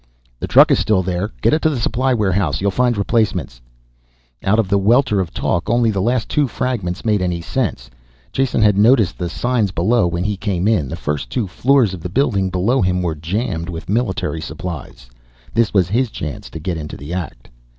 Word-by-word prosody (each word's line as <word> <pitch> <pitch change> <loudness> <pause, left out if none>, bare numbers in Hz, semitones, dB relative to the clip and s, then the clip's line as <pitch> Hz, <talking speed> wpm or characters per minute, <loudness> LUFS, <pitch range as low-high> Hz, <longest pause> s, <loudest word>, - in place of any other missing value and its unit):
"The - - -4
truck - - +6
is - - +4
still 95 -4 +2
there, 90 +2 -2
get - - +4
it 155 - +2
to 160 - +3
the 140 -5 -2
supply 130 +3 0
warehouse, 95 - +1
you'll 100 +1 0
find 125 +2 +1
replacements 95 - -1 0.4
..." - - -36
Out 105 +3 +2
of 115 -3 +2
the 100 +1 +2
welter 110 +1 +3
of 90 -3 -2
talk, 90 +4 -1
only 120 -1 +3
the 100 -2 -1
last 120 +3 0
two 145 -2 +1
fragments 115 -8 -3
made 105 -3 +2
any 90 -2 -1
sense. 65 -6 -3 0.4
Jason 130 -4 +1
had 105 -2 +4
noticed 110 -5 +4
the 90 -1 -2
signs 120 +3 0
below 95 +4 +2
when 85 +1 -2
he 105 +1 -1
came 95 -2 -1
in. 90 - +1
The - - -4
first 75 -1 -3
two 120 -5 -1
floors 120 +3 +2
of 90 - -7
the 90 - -5
building 100 -4 +1
below 95 +9 +1
him 90 -1 +1
were 85 -2 -1
jammed 85 +2 -3
with 85 0 -7
military 95 -8 -1
supplies. 80 -7 -7 0.5
This 115 -1 +2
was 95 -4 +3
his 120 +4 +1
chance 75 -8 -6
to 80 - -8
get 85 +1 -3
into 75 -1 -7
the 75 +5 -7
act. 85 -9 -6
95 Hz, 210 wpm, -19 LUFS, 85-115 Hz, 0.5 s, truck